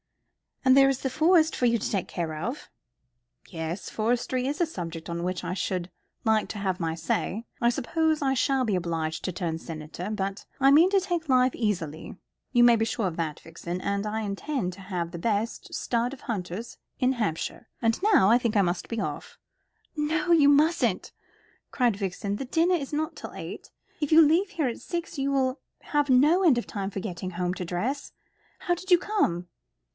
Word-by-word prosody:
"And 260 0 +7
there 270 0 +7
is 270 -1 0
the 265 - -1
Forest 320 +1 +4
for 250 - 0
you 235 0 +3
to 215 - -3
take 195 -4 -1
care 165 -3 -3
of." 155 - -5 0.8
"Yes, 165 +3 -5
forestry 245 +3 0
is 290 +5 -2
a - - +5
subject 170 - -6
on 170 0 -3
which 180 0 -2
I - - -3
should 185 -2 -2 0.3
like 220 -1 +2
to 210 - -5
have 190 -2 -1
my 165 -2 -1
say. 185 +6 -2
I 235 - +3
suppose 310 +5 0
I 270 -1 +2
shall 265 0 +2
be 210 -4 +1
obliged 165 -3 -2
to 185 - -1
turn 165 -2 -3
senator. 165 +3 -7
But 195 -2 -3
I 270 0 +6
mean 325 +6 +7
to 395 - +5
take 345 -4 -3
life 255 -1 +4
easily 170 -9 -3 0.4
you 240 -2 +5
may 240 -1 +7
be 225 0 +1
sure 220 -2 -1
of 170 - -4
that, 160 -3 -2
Vixen; 170 +2 -6
and 200 +1 -1
I 220 +1 -2
intend 200 0 -3
to 195 - -12
have 180 -3 -4
the 170 - -6
best 220 +3 -2
stud 240 +2 -1
of 270 - -11
hunters 210 0 -5 0.2
in 260 -1 +3
Hampshire. 215 -1 -3
And 225 +5 +1
now 390 - +5
I 235 - +6
think 235 -2 -1
I 205 - +5
must 175 0 -1
be 230 - -3
off." - - -5 0.6
"No, 310 +2 0
you 300 -4 +6
mustn't," 305 +4 +2 0.6
cried 240 -6 +1
Violet. 200 +1 -3
"The 270 - -4
dinner 330 +7 +2
is 290 -4 -4
not 310 +2 -1
till - - -8
eight. - - -8 0.3
If 295 -1 -2
you 320 +1 +9
leave 330 +5 +3
here 305 -5 0
at 235 - -4
six 340 -3 -5
you 275 +1 0
will 265 0 +1 0.2
have 290 -1 0
no 300 +9 +5
end 305 -9 +5
of 240 - -1
time 195 -2 -4
for 200 - -5
getting 185 -2 -5
home 180 0 -1
to 180 - -4
dress. 230 +12 -3 0.5
How 350 - 0
did 370 +2 -6
you 355 - +8
come?" 180 - 0
230 Hz, 200 wpm, -27 LUFS, 180-285 Hz, 0.8 s, you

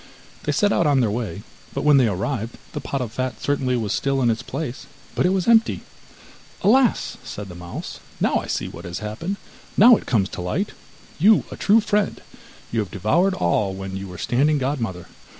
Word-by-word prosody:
They - - +1
set 205 -1 +2
out 170 - +2
on 140 -2 +4
their 115 -5 +2
way, 105 -2 -4 0.3
but 140 - -1
when 150 -1 +6
they 130 -3 +5
arrived, 110 +4 -2 0.2
the 150 - -4
pot 140 - -3
of 120 -3 -4
fat 130 -1 -3
certainly 130 -3 0
was 110 -3 -1
still 135 -1 0
in 120 - +4
its 115 +2 -2
place, 135 0 -5 0.3
but - - +2
it - - +2
was 190 0 0
empty. 230 -1 +4 0.8
'Alas!' 245 +4 +3
said 100 -1 -7
the - - -8
mouse, 85 0 -7 0.2
'now - - +2
I - - -4
see - - -2
what 85 - -9
has 85 0 -5
happened, 110 - -4 0.4
now 235 +4 +9
it - - -10
comes 105 -5 +2
to - - -6
light! 170 - -2 0.5
You 210 +6 +6
are - - -5
a - - -6
true 215 +3 +4
friend! 210 -1 0 0.5
You 115 - 0
have 105 -4 -2
devoured 165 - +1
all 95 +3 +1
when 95 0 -6
you 95 0 -5
were 90 -1 -9
standing 145 - +2
godmother. 120 - -2
125 Hz, 205 wpm, -22 LUFS, 100-165 Hz, 0.8 s, now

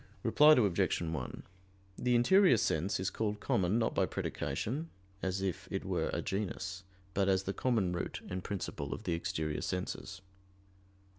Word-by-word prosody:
Reply 150 +7 +7
Obj. 100 - +2
1: 80 -6 -4 0.5
The 125 +3 +1
interior 180 - +6
sense 90 -1 0
is 95 - -1
called 105 -1 -2
"common" 95 +1 +1
not 115 - +1
by - - +2
predication, 150 +9 -3 0.3
as 95 +1 -1
if 95 -3 -3
it - - -3
were - - 0
a - - -2
genus; 95 -1 -3 0.3
but 100 -1 +2
as 95 0 +3
the 95 - -2
common 110 -8 +1
root 90 - -3
and 90 0 -4
principle 80 -8 -4
of - - -10
the 90 - -1
exterior 80 -2 -2
senses. 95 +1 -4
95 Hz, 155 wpm, -33 LUFS, 90-110 Hz, 0.5 s, Reply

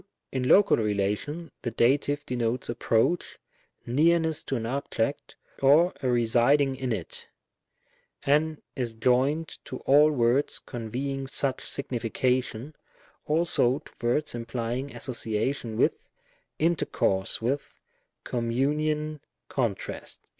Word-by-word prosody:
In 130 -1 -1
Local 200 0 +6
relation, 105 +10 -1
the 120 - -2
Dative 145 +5 +1
denotes 120 0 -2
approach, 120 +7 0 0.5
nearness 160 +4 +2
to 135 - -2
an 115 -3 -2
object, 135 +1 -2 0.3
or 150 +6 +5
a 130 - -1
residing 125 +4 +3
in 130 -1 -3
it 95 -7 -5 0.5
— - - -37
and 155 +1 +1 0.2
is 120 -4 -3
joined 130 +7 +1
to 130 - -6
all 145 +3 +6
words 130 0 +2
conveying 135 +4 -4
such 135 -1 0
signification, 125 +1 -2 0.5
also 150 -5 +2
to 150 - -15
words 145 +6 +1
implying 120 +2 -4
association 115 -1 -2
with, - - +4 0.6
intercourse 150 - +1
with, 135 +5 -2 0.5
communion, 150 +6 -1 0.3
contrast. 120 -7 -3
130 Hz, 105 wpm, -27 LUFS, 120-145 Hz, 0.6 s, Local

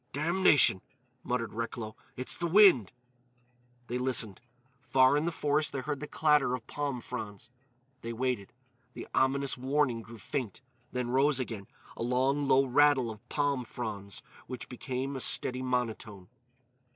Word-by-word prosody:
"Damnation," 155 - +4 0.4
muttered 115 -3 -2
Recklow, 115 -1 -5 0.2
"it's 130 - -1
the 170 - -2
wind!" 175 - +6 0.9
They 125 +1 -3
listened. 120 -6 0 0.4
Far 130 +1 +4
in 150 +2 +1
the 170 - 0
forest 150 -1 0
they 135 - -2
heard 145 +1 -3
the 150 - -6
clatter 150 -5 +2
of 120 - -9
palm 140 -4 -3
fronds. 110 -3 -7 0.5
They 115 - -5
waited. 120 -4 -2 0.4
The - - -8
ominous 135 0 +1
warning 130 -3 +1
grew 115 +1 -12
faint, 120 -1 -4 0.3
then 125 -1 -2
rose 135 +1 +3
again,—a 115 -5 -8
long, 130 +4 +1
low 135 0 +5
rattle 135 -2 +3
of 110 +3 -13
palm 145 -3 0
fronds 105 -4 -6 0.2
which 125 0 -7
became 130 +2 -4
a - - -3
steady 125 0 +2
monotone. 115 -6 -3
125 Hz, 140 wpm, -30 LUFS, 115-140 Hz, 0.9 s, wind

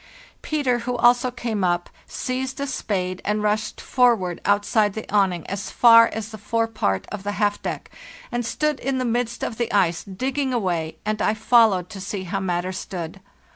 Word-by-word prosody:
Peter, 275 -6 0
who 245 +1 -3
also 245 +2 +4
came 230 -5 -3
up, 175 -1 +1 0.2
seized 260 +1 -3
a 280 - -1
spade 185 -8 -2
and 210 +1 -1
rushed 210 0 -1
forward 230 -9 +2
outside 205 0 +2
the 220 - -6
awning 190 -5 +2
as 195 0 -4
far 230 -1 +7
as 220 -1 -5
the 220 -1 -9
forepart 215 - -1
of 210 - -5
the 205 +1 -3
half 205 0 0
deck, - - -5 0.4
and 240 0 -1
stood 300 +5 -1
in 270 +1 -1
the 255 - -1
midst 240 0 -1
of 225 - -3
the 235 - -1
ice, 175 -5 +2
digging 260 +6 -2
away, 175 -7 -1
and 215 0 -1
I 215 - +2
followed 215 -5 +4
to 195 -3 -7
see 200 0 -4
how 190 +2 -3
matters 185 0 -2
stood. 175 +1 -6
210 Hz, 180 wpm, -23 LUFS, 190-240 Hz, 0.4 s, far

